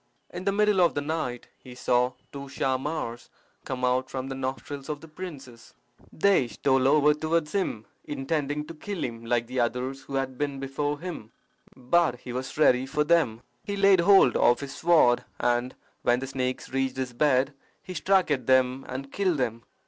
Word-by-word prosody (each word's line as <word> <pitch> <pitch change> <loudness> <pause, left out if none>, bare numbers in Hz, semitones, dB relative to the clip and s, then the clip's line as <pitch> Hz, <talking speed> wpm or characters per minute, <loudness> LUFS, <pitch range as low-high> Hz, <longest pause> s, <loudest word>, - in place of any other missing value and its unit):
In - - -7
the 200 - +3
middle 210 -1 +3
of 175 - +3
the 145 - 0
night 145 -5 -3
he 125 -1 -12
saw 125 0 +1 0.2
two 140 -1 -8
Shahmars 130 -2 -2 0.4
come 130 -1 -2
out 130 +1 +1
from 130 0 -4
the - - -3
nostrils 135 +2 -5
of 150 -1 -3
the 160 - -13
princess. 150 -8 -10 0.4
They 195 -7 +3
stole 130 +4 +1
over 150 +1 +5
towards 155 +1 -1
him, 150 - -2 0.2
intending 145 +1 -2
to 165 - -9
kill 190 +3 -5
him, 115 -1 -5
like 120 0 0
the 125 +2 -4
others 125 +3 -1
who 135 - -7
had 130 -1 -2
been 140 -2 -2
before 145 +2 -2
him: 165 -11 -7 0.4
but 130 0 +1
he 125 - -7
was 130 +3 -5
ready 130 -4 +4
for 150 +2 +1
them. 150 -8 +2 0.2
He 200 0 -4
laid 195 -2 +5
hold 190 -6 +6
of 120 +2 +4
his 140 0 -6
sword, 155 -8 +4 0.2
and 120 +1 0 0.3
when 120 +1 +2
the 135 - -4
snakes 130 -1 -3
reached 135 -1 -1
his 130 -2 -3
bed 135 +1 +2 0.3
he 185 - -7
struck 190 -1 +2
at 130 -5 -1
them 130 0 +3
and 135 +2 -6
killed 185 -5 0
them. 115 -3 -2
135 Hz, 185 wpm, -27 LUFS, 125-155 Hz, 0.4 s, hold